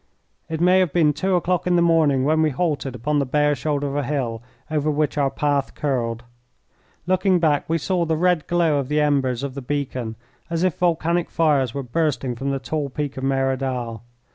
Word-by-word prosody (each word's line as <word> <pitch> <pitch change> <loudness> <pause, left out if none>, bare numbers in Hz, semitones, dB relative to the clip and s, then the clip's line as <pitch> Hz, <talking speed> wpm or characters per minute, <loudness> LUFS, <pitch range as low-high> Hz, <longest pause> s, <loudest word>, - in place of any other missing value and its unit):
It 160 -1 -3
may 180 +2 +5
have 185 -5 +2
been 155 -3 +3
two 190 +5 0
o'clock 180 0 0
in 180 - +3
the 170 - +4
morning 155 -6 +3
when 155 +3 +2
we 155 - +3
halted 145 -3 -2
upon 145 +5 0
the - - +2
bare 150 +2 +2
shoulder 145 +1 -2
of 140 0 -3
a 145 - +1
hill 125 -5 -2 0.3
over 155 -1 0
which 150 0 0
our 140 -2 +2
path 140 0 -1
curled. 120 -5 -2 0.8
Looking 185 +1 +2
back 155 -4 +1
we 165 - +2
saw 175 +2 0
the 160 -1 0
red 180 -2 +1
glow 165 -4 +2
of 135 - -3
the 150 0 +1
embers 135 -4 +1
of 140 -2 -3
the 140 - -6
beacon 130 -4 -3 0.3
as 170 +1 -1
if 185 -4 +1
volcanic 170 0 +1
fires 140 -7 +1
were 140 - -3
bursting 135 -1 -1
from 135 +4 -3
the 135 - 0
tall 140 +2 -3
peak 145 +1 -4
of 130 - -6
Merodal. 130 -4 -1
145 Hz, 205 wpm, -22 LUFS, 135-165 Hz, 0.8 s, may